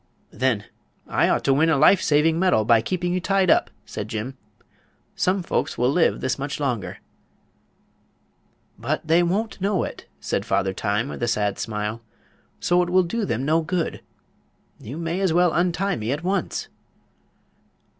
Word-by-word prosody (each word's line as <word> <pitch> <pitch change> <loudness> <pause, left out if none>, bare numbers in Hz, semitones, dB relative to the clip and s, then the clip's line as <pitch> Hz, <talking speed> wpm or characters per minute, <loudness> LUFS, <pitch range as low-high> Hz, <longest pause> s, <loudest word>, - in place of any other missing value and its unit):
"Then 130 -5 0 0.4
I - - +1
ought - - +1
to 135 - +3
win 155 +4 +3
a 160 - +3
life 185 +7 +5
saving 160 +2 +2
medal 180 - +3
by 115 0 +5
keeping 175 +6 -2
you 185 - +1
tied 190 0 +2
up," - - +3 0.2
said 105 - -6
Jim. 110 +5 -5 0.8
"Some 185 0 +1
folks - - -2
will 125 +2 +2
live 170 +3 +2
this 130 +1 -1
much 140 +2 -4
longer." 125 -8 -2 1.8
"But 145 +9 -2
they 165 +2 +4
won't 195 +4 -1
know 195 -2 +1
it," - - -7
said - - -2
Father 95 0 0
Time, 105 +5 -1
with - - -7
a 120 - 0
sad 105 -3 0
smile; 105 +1 -3 0.6
"so 175 0 +2
it 175 - -1
will 185 +1 +4
do 215 +5 -2
them 125 - -2
no 160 +3 +3
good. 165 +1 -2 0.8
You 130 +8 -8
may 170 +2 -2
as 190 -4 +1
well 175 0 +3
untie 180 +3 +1
me 110 +2 -3
at 150 +4 -3
once." 195 +2 -2
160 Hz, 165 wpm, -23 LUFS, 120-180 Hz, 1.8 s, life